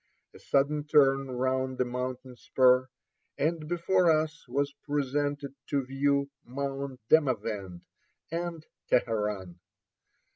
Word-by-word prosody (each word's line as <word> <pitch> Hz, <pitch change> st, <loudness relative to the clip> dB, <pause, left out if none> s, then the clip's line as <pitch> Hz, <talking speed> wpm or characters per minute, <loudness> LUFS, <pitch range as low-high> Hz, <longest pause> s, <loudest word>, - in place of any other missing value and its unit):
A -, -, -14 dB
sudden 145 Hz, +2 st, +1 dB
turn 135 Hz, -2 st, +4 dB
round 130 Hz, +1 st, -1 dB
a -, -, +4 dB
Ill 125 Hz, -, -6 dB
85 -, -, -9 dB
mountain 125 Hz, 0 st, -4 dB
spur, 130 Hz, +1 st, +3 dB, 0.5 s
and 155 Hz, +1 st, -1 dB
before 175 Hz, +1 st, +2 dB
us 155 Hz, -1 st, 0 dB
was 140 Hz, +3 st, -1 dB
presented 145 Hz, 0 st, -1 dB
to 140 Hz, -2 st, 0 dB
view 140 Hz, +1 st, +1 dB, 0.2 s
Mount 135 Hz, 0 st, -4 dB
Demavend 105 Hz, -, +1 dB, 0.5 s
and 170 Hz, -1 st, -4 dB, 0.2 s
Teheran. 105 Hz, -7 st, 0 dB
135 Hz, 115 wpm, -29 LUFS, 125-145 Hz, 0.5 s, turn